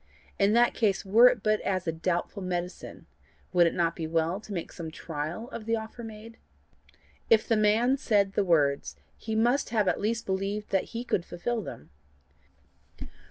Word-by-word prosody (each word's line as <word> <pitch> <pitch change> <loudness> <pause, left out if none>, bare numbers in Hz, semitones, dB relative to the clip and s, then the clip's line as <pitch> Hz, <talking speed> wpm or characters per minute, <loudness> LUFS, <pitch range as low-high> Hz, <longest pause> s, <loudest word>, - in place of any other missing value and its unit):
In 200 +1 +4
that 240 +1 +4
case, 205 -4 0
were 225 +6 +7
it 245 -5 +1
but 215 0 +2
as 185 -2 -1
a 165 - 0
doubtful 175 +4 -2
medicine, 180 -1 -5 0.5
would 175 -1 +5
it - - -1
not 170 -1 +1
be 160 - -4
well 165 +3 0
to 215 - -12
make 175 -4 -4
some 165 -2 -7
trial 160 +7 -5
of 220 -1 -7
the 230 - +2
offer 225 +2 -7
made? 225 +1 -10 0.9
If 220 -1 +4
the 225 - +3
man 220 +5 +3
said 200 -6 +1
the 205 - +2
words, 145 -6 +1 0.2
he 220 -1 -5
must 240 +6 +2
have 215 -4 +1
at - - +1
least 225 +2 -1
believed 195 +2 -3
that 195 - +1
he 235 - -3
could 195 -7 -1
fulfil 220 +8 -3
them. 120 - -10
205 Hz, 180 wpm, -28 LUFS, 175-225 Hz, 0.9 s, were